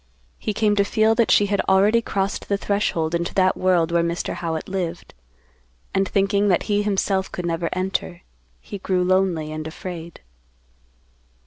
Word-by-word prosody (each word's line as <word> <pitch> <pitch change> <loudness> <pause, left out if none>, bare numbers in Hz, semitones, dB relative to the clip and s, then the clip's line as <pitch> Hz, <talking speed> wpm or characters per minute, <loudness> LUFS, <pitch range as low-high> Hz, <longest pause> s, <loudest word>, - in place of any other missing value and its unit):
He - - -2
came 210 -1 +2
to 200 - +5
feel 220 +2 +2
that 230 -1 +2
she 205 - +5
had 200 0 0
already 205 +4 +4
crossed 195 -3 -3
the 200 - +1
threshold 195 -6 -1
into 170 +1 -2
that 185 -1 +3
world 175 -3 +2
where 170 0 +3
Mr. 170 +1 -2
Howitt 160 -2 -4
lived. 180 -3 -4 0.8
And, 195 0 +1
thinking 200 +1 +2
that 180 -4 +2
he 205 0 +1
himself 195 -2 0
could 180 - -5
never 170 0 -1
enter, 185 -1 -3 0.4
he 205 - -8
grew 185 -1 0
lonely 180 -4 +1
and 155 0 -5
afraid. 170 0 -8
190 Hz, 160 wpm, -22 LUFS, 170-200 Hz, 0.8 s, to